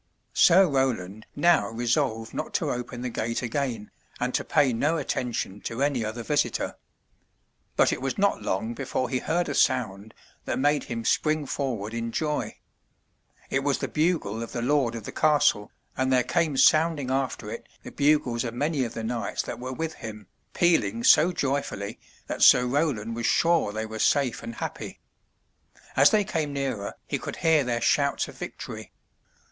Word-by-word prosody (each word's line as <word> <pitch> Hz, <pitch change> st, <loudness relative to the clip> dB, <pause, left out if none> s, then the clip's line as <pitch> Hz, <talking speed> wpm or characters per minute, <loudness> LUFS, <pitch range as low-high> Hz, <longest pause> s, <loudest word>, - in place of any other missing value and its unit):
Sir 185 Hz, +2 st, +6 dB
Roland 110 Hz, -8 st, -1 dB
now 170 Hz, +3 st, +3 dB
resolved 115 Hz, 0 st, -1 dB
not -, -, -5 dB
to -, -, 0 dB
open 125 Hz, 0 st, -5 dB
the 125 Hz, -, -3 dB
gate 115 Hz, +2 st, -2 dB
again, 120 Hz, -3 st, -3 dB, 0.3 s
and -, -, -1 dB
to -, -, 0 dB
pay 135 Hz, -4 st, +2 dB
no 150 Hz, +8 st, +1 dB
attention 120 Hz, -8 st, -3 dB
to 115 Hz, +4 st, -2 dB
any 140 Hz, -5 st, +1 dB
other 110 Hz, +2 st, -4 dB
visitor. 145 Hz, +3 st, 0 dB, 1.0 s
But -, -, +4 dB
it -, -, -5 dB
was 135 Hz, 0 st, -2 dB
not 200 Hz, 0 st, +1 dB
long 110 Hz, +5 st, -2 dB
before 130 Hz, 0 st, -2 dB
he 130 Hz, -, 0 dB
heard 175 Hz, +5 st, -1 dB
a -, -, -2 dB
sound 110 Hz, -4 st, 0 dB, 0.3 s
that -, -, -2 dB
made 145 Hz, +2 st, +2 dB
him 115 Hz, -2 st, -5 dB
spring 155 Hz, -1 st, +1 dB
forward 120 Hz, -6 st, -3 dB
in 115 Hz, 0 st, -3 dB
joy. 150 Hz, +3 st, -2 dB, 0.9 s
It 135 Hz, -, +2 dB
was 140 Hz, -1 st, +1 dB
the -, -, -3 dB
bugle 150 Hz, -, 0 dB
of 115 Hz, -, -6 dB
the 120 Hz, -, -2 dB
lord 130 Hz, -3 st, +1 dB
of 115 Hz, -, -6 dB
the -, -, -7 dB
castle, 145 Hz, -9 st, +2 dB, 0.2 s
and 130 Hz, 0 st, 0 dB
there 125 Hz, -1 st, +4 dB
came 155 Hz, -2 st, 0 dB
sounding 155 Hz, -3 st, +4 dB
after 135 Hz, -1 st, -2 dB
it -, -, -8 dB
the -, -, -9 dB
bugles 140 Hz, -5 st, +2 dB
of 115 Hz, -1 st, -5 dB
many 145 Hz, +1 st, 0 dB
of 115 Hz, -, -5 dB
the 115 Hz, -, -4 dB
knights 115 Hz, +1 st, -2 dB
that -, -, -6 dB
were 130 Hz, +1 st, -5 dB
with 160 Hz, +4 st, -3 dB
him, 105 Hz, -5 st, -9 dB, 0.3 s
pealing 115 Hz, -, +2 dB
so 170 Hz, +8 st, +6 dB
joyfully 130 Hz, -, -3 dB, 0.3 s
that -, -, -5 dB
Sir 125 Hz, -, +7 dB
Roland 125 Hz, -5 st, -1 dB
was 115 Hz, 0 st, -1 dB
sure 170 Hz, -10 st, +3 dB
they 110 Hz, +1 st, -3 dB
were 110 Hz, 0 st, -7 dB
safe 135 Hz, -2 st, +2 dB
and 115 Hz, -, -7 dB
happy. -, -, -6 dB, 1.0 s
As 135 Hz, +2 st, +7 dB
they 215 Hz, -1 st, +3 dB
came 160 Hz, -7 st, -2 dB
nearer, 135 Hz, -8 st, -3 dB
he -, -, -2 dB
could -, -, -6 dB
hear 160 Hz, -3 st, +3 dB
their 120 Hz, -2 st, -1 dB
shouts 140 Hz, +3 st, +2 dB
of -, -, -11 dB
victory. -, -, -8 dB
130 Hz, 175 wpm, -26 LUFS, 115-145 Hz, 1.0 s, Sir